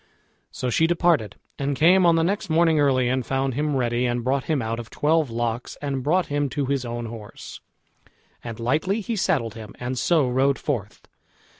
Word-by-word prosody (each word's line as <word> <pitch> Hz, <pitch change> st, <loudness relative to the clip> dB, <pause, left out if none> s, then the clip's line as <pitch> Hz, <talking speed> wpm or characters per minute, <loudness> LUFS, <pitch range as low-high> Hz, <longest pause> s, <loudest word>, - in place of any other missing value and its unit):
So 125 Hz, -, -3 dB
she 160 Hz, +8 st, +3 dB
departed, 170 Hz, -, +1 dB, 0.2 s
and 140 Hz, 0 st, -1 dB
came 175 Hz, +5 st, +5 dB
on 170 Hz, -, +5 dB
the 165 Hz, -, +2 dB
next 195 Hz, +1 st, -1 dB
morning 160 Hz, -1 st, +3 dB
early 130 Hz, -3 st, +3 dB
and 130 Hz, +1 st, 0 dB
found 135 Hz, +1 st, -1 dB
him 150 Hz, +2 st, -1 dB
ready, 120 Hz, -1 st, 0 dB
and 120 Hz, 0 st, -1 dB
brought 130 Hz, +2 st, 0 dB
him 155 Hz, -3 st, 0 dB
out 115 Hz, -1 st, -3 dB
of 115 Hz, -, -8 dB
twelve 155 Hz, -1 st, +1 dB
locks, 115 Hz, +1 st, -3 dB
and 140 Hz, -2 st, -3 dB
brought 170 Hz, +7 st, +2 dB
him 145 Hz, -1 st, -1 dB
to 145 Hz, +1 st, -2 dB
his 135 Hz, -1 st, -1 dB
own 120 Hz, 0 st, -4 dB
horse, 110 Hz, -2 st, -9 dB, 0.8 s
and 115 Hz, -2 st, -7 dB
lightly 155 Hz, -, 0 dB
he 225 Hz, +3 st, -3 dB
saddled 145 Hz, -, 0 dB
him, 110 Hz, -2 st, -10 dB
and 125 Hz, +1 st, -3 dB
so 160 Hz, -6 st, +2 dB
rode 135 Hz, +2 st, +2 dB
forth. 115 Hz, -9 st, -4 dB
135 Hz, 190 wpm, -24 LUFS, 120-160 Hz, 0.8 s, came